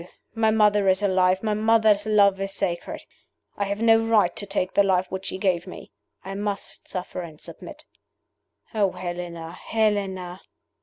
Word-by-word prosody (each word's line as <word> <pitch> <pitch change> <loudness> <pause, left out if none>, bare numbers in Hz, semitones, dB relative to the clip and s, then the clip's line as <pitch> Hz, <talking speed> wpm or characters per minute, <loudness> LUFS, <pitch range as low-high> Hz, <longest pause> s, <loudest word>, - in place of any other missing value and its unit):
My 225 0 +2
mother 210 -2 +3
is 190 +2 +2
alive; 185 -1 +2
my 215 -1 0
mother's 220 -1 +3
love 200 -2 +4
is 195 0 -1
sacred. 175 -3 -3 0.5
I 200 - -1
have 200 +2 -3
no 225 -1 +6
right 215 -6 +3
to 205 - -4
take 190 -2 -2
the - - +5
life 190 -2 +2
which 190 0 -5
she - - -4
gave 185 -3 0
me. 180 - -10 0.3
I 195 - -5
must 200 0 -4
suffer 185 0 -5
and 160 -3 -10
submit. - - -9 0.9
Oh, 200 -4 +1
Helena! 175 -2 -6
Helena!" 190 -3 -2
195 Hz, 160 wpm, -24 LUFS, 185-210 Hz, 0.9 s, no